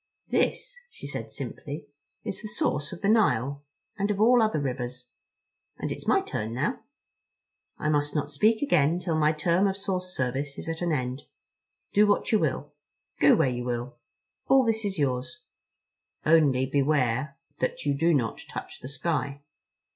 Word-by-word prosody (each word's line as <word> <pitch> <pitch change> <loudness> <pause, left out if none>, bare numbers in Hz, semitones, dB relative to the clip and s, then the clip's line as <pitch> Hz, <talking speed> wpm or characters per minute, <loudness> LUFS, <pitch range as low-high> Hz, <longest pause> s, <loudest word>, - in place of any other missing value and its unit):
"This," - - 0
she - - -11
said 115 -6 -5
simply, 140 +5 -6 0.4
"is - - -4
the 215 - -6
source 145 -8 -1
of 180 - -8
the - - +2
Nile. 145 - +2 0.4
And 200 +1 +1
of 205 -1 0
all 240 +3 +6
other 215 -8 +2
rivers. 125 -2 -4 0.7
And - - -3
it's - - -6
my - - +4
turn 110 +2 -4
now. - - -1 1.0
I - - -2
must 145 0 +1
not 150 0 -1
speak 220 - +3
again 165 - +3
till 175 -2 -2
my 155 -1 +4
term 170 +5 +2
of 195 0 -1
source 185 -2 -3
service 135 +3 -2
is - - -7
at 165 +1 -3
an 175 -1 0
end. 130 -2 -2 0.7
Do 210 +1 +5
what 205 - +2
you 215 - +4
will. 145 -2 -2 0.5
Go 145 - +7
where - - +3
you 125 -1 -3
will. 120 0 -4 0.5
All 265 -2 +5
is 220 -4 0
yours. 140 - -2 0.8
Only 145 -5 +4
beware 140 -1 +1 0.2
that 130 - -2
you 145 - +2
do 165 +4 +3
not 120 -8 0
touch - - -7
the 130 - -8
sky. 140 0 -2
145 Hz, 165 wpm, -27 LUFS, 130-185 Hz, 1.0 s, Go